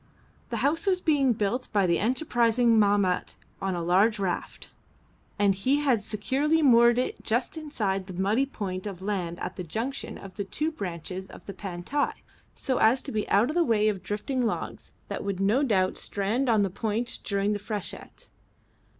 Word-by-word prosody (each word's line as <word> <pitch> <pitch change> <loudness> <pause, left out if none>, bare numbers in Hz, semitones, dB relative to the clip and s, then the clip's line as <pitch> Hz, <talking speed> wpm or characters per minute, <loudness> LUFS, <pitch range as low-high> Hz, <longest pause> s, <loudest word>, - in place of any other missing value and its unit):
The - - -2
house 325 +7 +1
was 370 -2 +3
being 290 -6 +3
built 225 +4 -1
by 200 -3 +3
the 170 -1 +2
enterprising 235 -2 +2
Mahmat 200 -3 +2 0.3
on 195 -2 -1
a 170 - -3
large 195 +6 +3
raft, 190 -3 -3 0.7
and 200 -1 +4
he 225 +9 +1
had 275 -7 +2
securely 270 +10 0
moored 235 -3 +6
it 250 - -1
just 240 +6 0
inside 210 - -2
the 185 -2 -7
muddy 215 +8 +2
point 190 -6 -5
of 190 -2 -7
land 180 -4 -2
at - - -5
the 180 - -4
junction 225 - -4
of 195 -1 -11
the 200 - -1
two 305 +11 -2
branches 185 - -6
of - - -13
the 200 - -7
Pantai 190 +9 -2 0.4
so 260 -3 -1
as 240 +4 +4
to 275 - -5
be 215 -1 -2
out 210 +5 +4
of - - -6
the 350 - +4
way 215 -6 +3
of 195 -3 -3
drifting 250 +5 -2
logs 230 - -3 0.2
that - - -4
would 200 -2 -3
no 205 +7 +3
doubt 190 -9 +1
strand 220 +7 -1
on 220 -3 +4
the 195 - -1
point 225 +4 -2
during 200 +1 0
the 205 - -2
freshet. 205 -1 -6
210 Hz, 185 wpm, -27 LUFS, 195-255 Hz, 0.7 s, moored